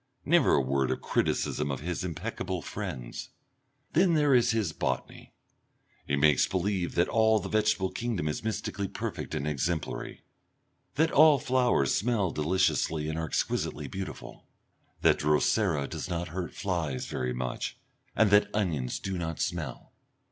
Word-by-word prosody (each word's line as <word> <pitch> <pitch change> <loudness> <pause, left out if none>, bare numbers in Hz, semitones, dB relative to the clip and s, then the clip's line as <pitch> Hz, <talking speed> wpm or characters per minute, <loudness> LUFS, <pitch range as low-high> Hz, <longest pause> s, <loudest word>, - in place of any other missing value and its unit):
Never 170 +3 +4
a - - +3
word 65 0 0
of - - -1
criticism - - 0
of 70 -1 -3
his 85 +3 -3
impeccable 90 +1 -4
friends! 85 - -6 0.6
Then 175 0 +4
there 145 -2 +4
is 120 -2 +4
his 110 -7 0
botany. 65 -3 -3 0.8
He 70 - +1
makes 70 -1 +4
believe 95 -1 -1
that 85 - +3
all 110 -1 +4
the 95 -2 -4
vegetable 105 -3 +1
kingdom 115 -10 -2
is 75 - -3
mystically 105 -2 -2
perfect 80 - -5
and 75 -1 -2
exemplary, 75 +3 -3 0.7
that 160 +2 +3
all 155 0 +7
flowers 125 - +2
smell 100 -3 +1
deliciously 80 -2 +1
and 80 +1 -3
are 80 - -2
exquisitely 75 -1 -1
beautiful, 95 +6 -7 0.5
that - - +4
Drosera 75 +1 +2
does - - -5
not 85 -1 -3
hurt 90 +1 -5
flies 85 -9 -2
very 65 0 -3
much, 60 0 -4 0.4
and 110 -3 +4
that 105 0 +5
onions 80 - -1
do 95 -2 -4
not 80 -1 -4
smell. - - -4
90 Hz, 150 wpm, -29 LUFS, 75-105 Hz, 0.8 s, all